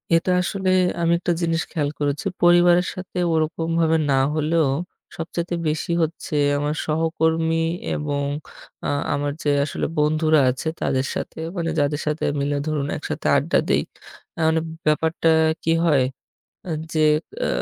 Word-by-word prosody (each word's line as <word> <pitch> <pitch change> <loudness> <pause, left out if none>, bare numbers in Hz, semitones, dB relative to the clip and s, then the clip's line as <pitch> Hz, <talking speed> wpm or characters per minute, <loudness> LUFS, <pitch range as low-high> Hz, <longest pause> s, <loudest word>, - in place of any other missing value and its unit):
এটা 180 +2 +2
আসলে 190 +1 -1 0.3
আমি 170 0 +2
একটা 175 - -1
জিনিস 165 -1 +1
খেয়াল 145 -3 -1
করেছি, 145 +6 -1 0.2
পরিবারের 175 +1 +5
সাথে 180 0 -8 0.2
ওরকমভাবে 160 +1 +1
না 135 - +3 0.2
হলেও, 155 0 +2 0.5
সবচাইতে 170 +1 -3
বেশি 155 +2 -1
হচ্ছে, 160 -1 -4 0.2
আমার 145 +1 -1
সহকর্মী 160 +1 +1 0.4
এবং 145 -1 -2 0.6
আ - - 0 0.3
আমার 145 0 -1
যে 145 - +1 0.2
আসলে - - -3
বন্ধুরা 155 +1 +3
আছে 130 +5 -3
তাদের 135 -1 0
সাথে - - -5 0.2
মানে, 165 -1 -1
যাদের 145 +1 0
সাথে 150 +1 -1 0.2
মিলে 145 +1 0
ধরুন 145 -2 -1
একসাথে - - -4
আড্ডা - - +1
দেই। - - +3 0.6
আ - - -8
মানে 160 0 +3 0.3
ব্যাপারটা 160 +2 +2 0.3
কি 165 - +1
হয়, 140 -5 +4 0.6
এ্যা 175 - -4 0.2
যে 155 - 0 0.5
আ - - +1
160 Hz, 145 wpm, -22 LUFS, 150-165 Hz, 0.6 s, পরিবারের